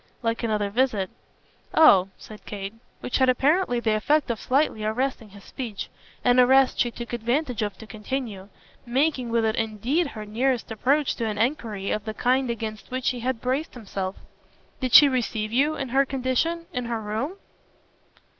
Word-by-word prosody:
"Like 230 0 -1
another 210 -3 -1
visit." 220 -5 0 0.6
"Oh!" 195 - +7
said 215 -1 -12
Kate. 200 0 -5 0.3
Which 250 - -1
had 260 -1 +4
apparently 275 +1 +2
the 225 -2 +1
effect 280 +6 +2
of 230 - -4
slightly 260 -5 +1
arresting 230 +1 -2
his 200 0 -14
speech 230 -4 -6 0.4
an 245 0 +5
arrest 265 +1 +5
she 240 - +3
took 235 0 -8
advantage 240 +2 -1
of 205 -1 -3
to 220 - -10
continue; 215 -2 -5 0.3
making 260 0 0
with 230 -1 +1
it 220 0 +1
indeed 230 - 0
her 215 -6 -8
nearest 240 +3 -1
approach 275 +6 +1
to 230 - -1
an 210 -1 -3
enquiry 220 -5 -1
of 215 - -2
the 220 -1 -5
kind 255 +2 +1
against 220 -3 -5
which 255 0 -1
he 250 - -3
had 250 0 -2
braced 265 +5 -2
himself. 195 -4 -4 0.6
"Did 255 -2 -2
she 295 - +11
receive 225 -5 -1
you 290 +5 +2
in 270 -2 -4
her 270 +3 +4
condition 270 +6 -1
in 250 -1 -2
her 230 -1 -2
room?" 220 - -3
240 Hz, 175 wpm, -25 LUFS, 215-265 Hz, 0.6 s, she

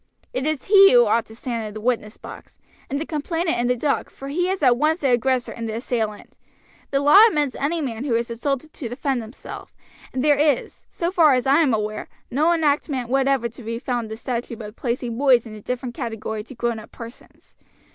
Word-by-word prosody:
"It 265 +3 -1
is 310 -4 -1
he 395 -1 +7
who 485 0 +7
ought 230 -1 +1
to 220 - -13
stand 230 -2 -4
in 210 - -9
the - - -5
witness 225 -1 -1
box; - - -12 0.3
and 280 - -2
the 315 - -3
complainant 325 +1 -1
in 240 - +1
the 250 - +2
dock, 275 +4 -1
for 275 - -9
he 355 +5 0
is 380 -4 -2
at 250 -2 +6
once 310 +6 +1
the 275 -3 +2
aggressor 250 +1 +1
and 230 -1 -5
the 220 - -4
assailant. 225 -3 -3 0.6
The 275 0 +1
law 295 +9 +8
admits 295 - 0
any 320 +4 -1
man 245 -4 -4
who 260 -5 0
is 235 0 -1
assaulted 275 +5 -3
to 240 - -6
defend 255 +1 -2
himself, 225 +2 -10 0.4
and 260 - -2
there 290 -1 +4
is, 295 -4 0
so 340 +1 -2
far 320 -7 +5
as 250 - -1
I 275 +3 +4
am 300 -5 +3
aware, 215 -1 -2 0.2
no 305 +7 +3
enactment 290 -6 0
whatever 270 -2 +2
to 235 +3 -13
be 230 0 -4
found 245 -1 -2
in - - -10
the 220 - -6
statute 240 -1 -4
book 210 0 -9
placing 240 -1 -3
boys 260 -4 +4
in 220 - -9
a 215 - -10
different 250 +2 -4
category 225 -4 -4
to 265 - -12
grownup 230 -2 -3
persons. 230 +1 -13
255 Hz, 220 wpm, -22 LUFS, 230-290 Hz, 0.6 s, law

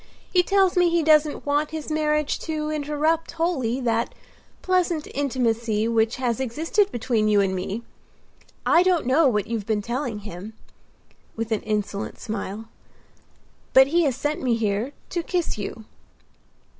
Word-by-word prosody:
He 360 - +6
tells 385 0 +2
me 355 -1 +4
he 335 -1 +2
doesn't 305 -1 +3
want 290 +1 +1
his 315 0 -6
marriage 300 -1 +1
to 305 -1 -3
interrupt 305 +2 0
wholly 320 -8 0
that 230 -1 0 0.5
pleasant 360 -4 +1
intimacy 235 -5 0
which 225 0 +2
has 250 -2 -1
existed 320 - 0
between 225 -2 0
you 210 -1 +4
and 195 -1 +2
me. 190 +5 -4 0.8
I 340 - +5
don't 360 -5 +2
know 275 +5 +4
what 210 -5 +1
you've 225 -3 -4
been 215 -2 0
telling 235 -2 -3
him," 200 +1 -8 0.8
with 225 0 -4
an 220 - +1
insolent 210 -1 -3
smile, 215 0 -5 1.1
"but 265 +1 +7
he 340 +3 +3
has 270 -4 +1
sent 295 +3 -2
me 245 -3 +2
here 220 +4 -1 0.2
to 345 - -1
kiss 345 - -2
you." 215 +2 -6
260 Hz, 150 wpm, -24 LUFS, 220-315 Hz, 1.1 s, but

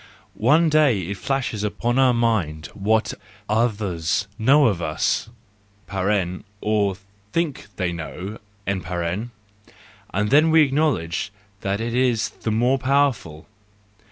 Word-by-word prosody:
One 150 +9 +3
day 150 -8 +4
it 95 +3 -5
flashes 125 -4 -2
upon 120 +4 0
our 130 -1 +5
mind 105 -10 0
what 110 +2 +1 0.3
others 100 -5 0
know 140 +6 +5
of 100 -6 +1
us 80 +7 0 1.3
(or 105 -2 +1 0.4
think 160 - -2
they 90 -2 -1
know)—and 90 +5 -6 1.9
then 155 +3 +6
we 160 0 +6
acknowledge 135 - 0 0.3
that 100 0 -2
it 115 +1 -3
is 125 -3 +2
the - - -5
more 125 +5 +2
powerful. 130 - 0
110 Hz, 105 wpm, -23 LUFS, 100-135 Hz, 1.9 s, then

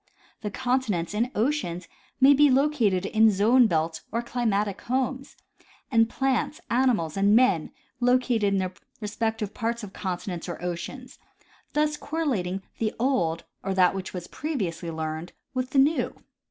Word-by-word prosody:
The 210 - -3
continents 230 -8 -1
and 230 +4 0
oceans 210 - -1 0.3
may 275 +1 +8
be 290 +1 +5
located 255 -9 +2
in 220 +2 +5
zone 225 +5 +5
belts 160 -3 -1
or 235 +1 -1
climatic 210 -5 -1
homes, 260 +2 -2 0.5
and 225 -2 +4
plants, 265 -2 0
animals 235 -11 +2
and 200 +2 +4
men 200 -10 +3 0.3
located 245 -3 +2
in 200 -1 +2
their 185 -1 -1 0.3
respective 220 0 -2
parts 235 0 -2
of 200 -2 -8
continents 180 -2 -4
or 175 - -5
oceans; 180 +9 -6 0.5
thus 300 0 +1
correlating 215 - -2 0.2
the 215 -1 -1
old, 175 -11 +1 0.2
or 195 0 -2
that 180 -1 +5
which 195 -1 -5
was 180 -2 -6
previously 195 - -3
learned, 160 +1 -4 0.2
with 255 -1 -2
the 275 - -2
new. 290 +4 +3
220 Hz, 145 wpm, -26 LUFS, 185-255 Hz, 0.5 s, may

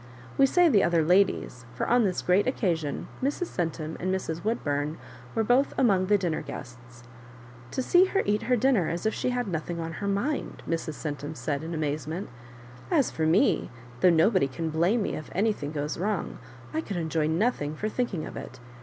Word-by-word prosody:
We 275 - +5
say 355 +5 +5
the 220 -11 +5
other 170 -2 +3
ladies, 180 -8 +2
for - - -2
on 240 -1 +4
this 185 -2 -1
great 185 +5 +3
occasion 170 - -1
Mrs. 290 +6 -2
Centum 160 -2 -2
and 185 +1 -1
Mrs. 170 -3 -2
Woodbum 150 -8 -1 0.4
were 225 - +2
both 250 +5 +2
among 195 -7 +3
the 205 +1 +5
dinner 175 -5 -1
guests. 120 0 -10 0.3
" 120 0 -18
To 260 - -1
see 355 +7 +5
her 390 +1 0
eat 210 +1 +1
her 250 - +5
dinner 235 -8 +2
as 170 +4 -3
if 220 - +2
she - - -1
had 245 -2 -1
nothing 170 -1 -3
on 165 0 -4
her 200 - -1
mind 205 +10 -2
I" - - -9
Mrs. 165 -2 -2
Centum 145 0 -5
said 145 0 -2
in 165 +1 -4
amazement: 155 +4 -3 0.6
"as 300 -8 +2
for 160 -1 0
me, 190 - +3 0.3
though 180 - +6
nobody 165 -2 +4
can 160 +4 -4
blame 180 +8 +2
me - - -2
if 155 - -7
anything 195 -7 0
goes 150 0 -3
wrong, 210 +4 -2 0.3
I 315 - 0
could 200 - -5
enjoy 160 -2 0
nothing 160 -3 0
for 210 - -2
thinking 215 -7 -2
of - - -8
it. 130 - -8
175 Hz, 200 wpm, -27 LUFS, 155-220 Hz, 0.6 s, though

